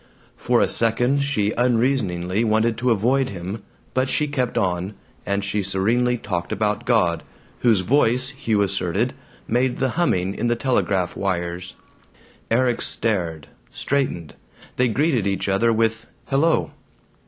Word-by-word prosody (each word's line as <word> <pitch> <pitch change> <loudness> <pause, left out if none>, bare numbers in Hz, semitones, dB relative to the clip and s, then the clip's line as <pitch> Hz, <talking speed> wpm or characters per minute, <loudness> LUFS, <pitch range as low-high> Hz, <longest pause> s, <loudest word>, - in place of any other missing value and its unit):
For - - +1
a - - +3
second 120 +5 +2
she 130 -8 0
unreasoningly 115 -6 +1
wanted 110 +1 +2
to 125 +1 +1
avoid 125 +5 +2
him, 95 +3 -6 0.3
but 130 0 +1
she 150 +3 0
kept 130 -4 -2
on, 90 +2 -1 0.3
and 100 +1 0
she 105 +1 -1
serenely 115 +6 +1
talked 90 -6 -4
about 105 +1 -1
God, 90 -9 +2 0.4
whose 115 -6 +3
voice, 125 +3 +2
Hugh 115 -7 0
asserted, 95 -3 -1 0.3
made 125 +2 +1
the 130 - 0
humming 100 - 0
in 120 - -2
the 120 - +2
telegraph 100 -8 0
wires. 90 -1 -3 0.7
Erik 120 +1 +1
stared, 85 -9 -2 0.2
straightened. 130 - -2 0.4
They 125 - +2
greeted 125 - +1
each 95 0 -1
other 100 +4 +2
with 115 0 0 0.2
"Hello." 155 +4 +1
115 Hz, 135 wpm, -22 LUFS, 95-125 Hz, 0.7 s, a